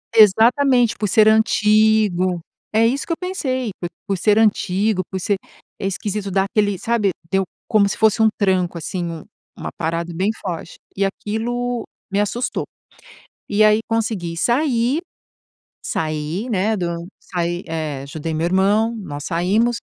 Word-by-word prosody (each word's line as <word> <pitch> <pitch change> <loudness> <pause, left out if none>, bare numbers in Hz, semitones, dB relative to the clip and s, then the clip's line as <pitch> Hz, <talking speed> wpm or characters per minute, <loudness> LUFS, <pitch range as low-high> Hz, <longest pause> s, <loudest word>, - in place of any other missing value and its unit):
Exatamente, 235 +4 +5
por 210 - -1
ser 215 +3 +5
antigo. 215 -4 +3 0.3
É 225 +1 +4
isso 265 +5 0
que 335 - 0
eu - - -5
pensei, 260 - -2
p 175 - -3 0.2
por 195 - 0
ser 210 +4 +3
antigo, 205 -2 +2
por 190 - -3
ser 200 +2 0 0.4
É 195 - -4
esquisito, 200 +1 -3
dá 195 +1 +2
aquele 205 -1 +1
sabe. 210 -1 +1 0.2
Deu 195 0 +2 0.2
como 210 -3 +4
se - - -3
fosse 220 +1 +3
um 220 - +6
tranco 185 -4 +1
assim, 175 +2 -4
um 165 -2 -6 0.4
uma - - -5
parada 165 +1 -2
bem 190 +4 +1
forte 170 -3 -5 0.2
e 195 - 0
aquilo 235 +4 -2 0.3
me 200 - +1
assustou. 240 +5 -2 0.9
E 210 +1 +3
aí, 215 0 +5
consegui 215 -7 -1
sair. 245 - +2 0.9
Saí, 155 +8 -2
né, 215 +1 +1
do 170 -2 -3
saí 175 0 -3
eh, 155 -4 -3
ajudei 155 +3 -5
meu 160 - -1
irmão, 205 +5 +2
nós 145 -7 -7
saímos 200 +8 +1
205 Hz, 150 wpm, -20 LUFS, 175-225 Hz, 0.9 s, um